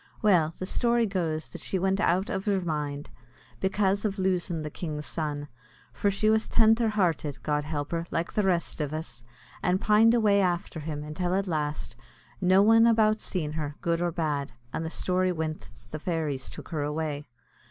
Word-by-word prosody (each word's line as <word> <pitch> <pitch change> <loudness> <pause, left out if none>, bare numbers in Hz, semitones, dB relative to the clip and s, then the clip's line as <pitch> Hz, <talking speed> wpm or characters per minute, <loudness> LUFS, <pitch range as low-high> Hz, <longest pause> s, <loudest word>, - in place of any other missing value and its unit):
Well, 175 -7 +4
the 185 - -4
story 235 +3 +2
goes 165 -6 -2
that - - -9
she 190 - -1
went 190 +1 +1
out 185 0 +2
iv 190 - -2
her 200 -2 +2
mind, 150 -4 -3 0.5
bekase 195 +1 +1
av 205 -2 -1
loosin' 180 -3 0
the 150 - -5
king's 150 -3 -5
son 150 -2 -3 0.5
for 205 - +1
she 200 +2 0
was 220 0 +3
tendher 225 0 +4
hearted, 170 -8 0
God 150 -1 0
help 145 -2 -3
her, 170 0 -2
like 165 - -2
the 210 - +2
rest 180 -4 0
iv 150 0 -2
us! 155 -7 -5 0.4
and 180 +2 +2
pined 220 +3 +5
away 205 -3 +4
after 175 -3 -1
him, 150 -1 -5
until 175 +4 -2
at 195 0 +1
last, 150 -4 -3 0.5
no 185 +2 +5
one 225 +2 +6
about 220 -1 +3
seen 160 -5 -2
her, 150 -2 -4
good 170 0 0
or 175 -1 +1
bad; 150 -5 -2 0.2
and 160 - -2
the 160 - -3
story 185 +2 0
wint 160 -2 -4
that - - -20
the 155 - -4
fairies 155 -5 -2
took - - -10
her 160 -4 -2
away. 150 0 -3
175 Hz, 190 wpm, -28 LUFS, 155-195 Hz, 0.5 s, one